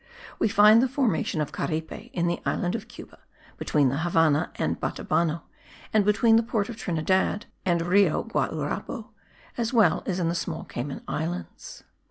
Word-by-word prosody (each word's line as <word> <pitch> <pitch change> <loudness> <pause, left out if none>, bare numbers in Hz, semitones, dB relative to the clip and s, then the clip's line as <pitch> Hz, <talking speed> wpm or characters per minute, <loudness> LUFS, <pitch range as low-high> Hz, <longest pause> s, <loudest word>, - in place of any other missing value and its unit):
We - - +3
find 210 +2 +6
the 260 - +3
formation 240 - 0
of 150 -1 -3
Caripe 160 0 -4
in 175 - -1
the 175 0 -1
island 175 +1 -1
of 225 -1 -5
Cuba 245 - -13 0.4
(between 145 -3 +2
the 140 +3 -2
Havannah 160 -3 +2
and - - -1
Batabano 165 -1 -1 0.5
and 215 -1 +4
between 225 +2 +4
the - - +4
port 225 -2 -2
of 235 - -5
Trinidad 190 +1 0 0.2
and 170 -2 +2
Rio 180 -1 +3
Guaurabo), - - -3 0.5
as 230 +1 -1
well 225 -4 +4
in 180 -3 0
the 170 - 0
small 170 - -3
Cayman 135 +4 -6
Islands. 170 +4 -5
180 Hz, 160 wpm, -26 LUFS, 165-220 Hz, 0.5 s, find